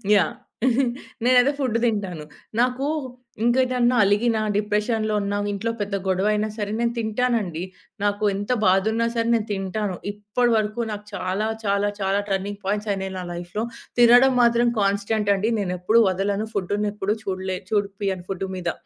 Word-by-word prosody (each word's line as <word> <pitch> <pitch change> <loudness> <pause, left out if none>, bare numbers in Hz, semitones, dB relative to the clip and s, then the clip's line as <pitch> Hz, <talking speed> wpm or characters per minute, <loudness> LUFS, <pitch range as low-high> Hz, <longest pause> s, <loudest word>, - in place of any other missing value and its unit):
Yeah! 180 -6 +2 0.9
నేనైతే 250 +2 +5
food 250 -5 +1
తింటాను. 195 -8 -1 0.4
నాకు 250 +3 +1 0.6
ఇంకేదైనా 250 0 +3
అలిగిన, 220 +3 +2 0.2
డిప్రెషన్‌లో 215 +1 0
ఉన్న, 200 0 -2 0.2
ఇంట్లో 225 +3 -2
పెద్ద 200 0 -2
గొడవయినా 210 +3 +1
సరే, 205 -1 -3
నేను 235 0 +1
తింటానండి. 220 -6 -1 0.4
నాకు 205 +1 0
ఎంత 205 +4 -3
బాధున్నా 220 +5 +3
సరే, 230 0 0
నేను 220 -1 -1
తింటాను. 195 0 -2 0.2
ఇప్పటి 210 +4 0
వరకు 215 +2 -1
నాకు 210 0 -6
చాలా 195 +4 -1 0.2
చాలా 200 0 +2
చాలా 195 +1 +1
టర్నింగ్ 200 +1 -2
పాయింట్స్ 210 +2 -1
అయినాయి 190 0 -4
నా 180 - -5
లైఫ్‌లో. 175 +5 -4 0.4
తినడం 245 +2 +7
మాత్రం 235 0 +4
కాన్స్టెంటండి. 200 +1 +1
నేనెప్పుడు 185 +4 +2
వదలను. 200 +3 -1
ఫుడ్డునెప్పుడు 205 +1 -1
చూడలే 190 -1 -3
చూపియను 200 -3 -1
ఫుడ్డు 195 0 -3
మీద. 175 -2 -1
205 Hz, 135 wpm, -23 LUFS, 195-225 Hz, 0.9 s, తినడం